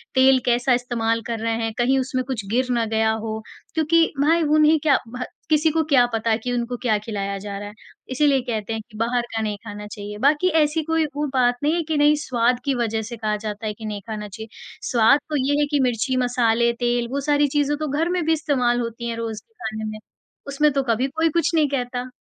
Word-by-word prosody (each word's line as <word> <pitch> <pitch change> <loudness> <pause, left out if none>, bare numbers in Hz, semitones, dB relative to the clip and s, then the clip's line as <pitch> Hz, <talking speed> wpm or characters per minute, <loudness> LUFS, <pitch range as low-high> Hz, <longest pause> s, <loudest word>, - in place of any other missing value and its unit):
तेल 260 0 +6
कैसा 245 +1 +2
इस्तेमाल 230 -2 0
कर 230 -2 -3
रहे 230 0 -1
हैं, 225 -1 -2
कहीं 255 +3 +2
उसमें 255 0 -1
कुछ 230 -7 -3
गिर 255 +2 +1
ना 235 -2 +1
गया 220 0 +3
हो, 220 0 -3 0.3
क्योंकि 330 +1 +3 0.2
भाई 325 +3 +3
उन्हें 305 +1 +4
क्या 300 -3 +4
भ 250 +2 -5 0.3
किसी 310 +1 +4
को 320 +1 +1
क्या 250 -3 +6
पता 225 0 +1
कि 250 - -2
उनको 245 0 -2
क्या 220 -4 +2
खिलाया 200 -2 -4
जा 200 0 -6
रहा 205 - -6
है, 210 - -13 0.4
इसीलिए 275 0 +3
कहते 220 -2 -2
हैं 220 - -3
कि 215 - -12
बाहर 235 +2 +1
का 225 - 0
नहीं 210 -1 -2
खाना 210 -1 -7
चाहिए 210 -1 -7
बाकी 295 +6 +3
ऐसी 305 +2 +1
कोई 325 0 +1
वो 295 0 -1
बात 245 -2 +2
नहीं 300 +2 +2
है 340 - 0
कि 315 - +1
नहीं 295 +1 +5
स्वाद 245 -2 +1
की 275 - +1
वजज़ 225 -2 -1
से 235 - -7
कहा 215 -1 -1
जाता 210 0 -6
है 210 - -2
कि 220 +1 -10
नहीं 210 -1 -4
खाना 210 -1 -5
चाहिए, 220 +2 -9 0.4
स्वाद 240 +4 +5
तो 305 - -2
ये 290 +1 +2
है 295 - +3
कि 290 - +2
मिर्ची, 250 +1 0
मसाले, 235 -1 +2
तेल 240 0 0
वो 280 - -1
सारी 290 0 +4
चीज़ें 290 +1 0
तो 310 0 -3
घर 310 +5 0
में 360 -2 0
भी 325 - +3
इस्तेमाल 265 -6 +1
होती 235 0 -4
हैं 230 - -4
रोज़ 225 -2 -4
के 450 - -40
खाने 220 0 -4
में, 215 - -8 0.5
उसमें 295 +2 +2
तो 275 - +1
कभी 245 +4 +1
कोई 320 +4 0
कुछ 335 +1 +1
नहीं 310 -2 +4
कहता। 250 -2 -3
245 Hz, 235 wpm, -22 LUFS, 225-290 Hz, 0.5 s, तेल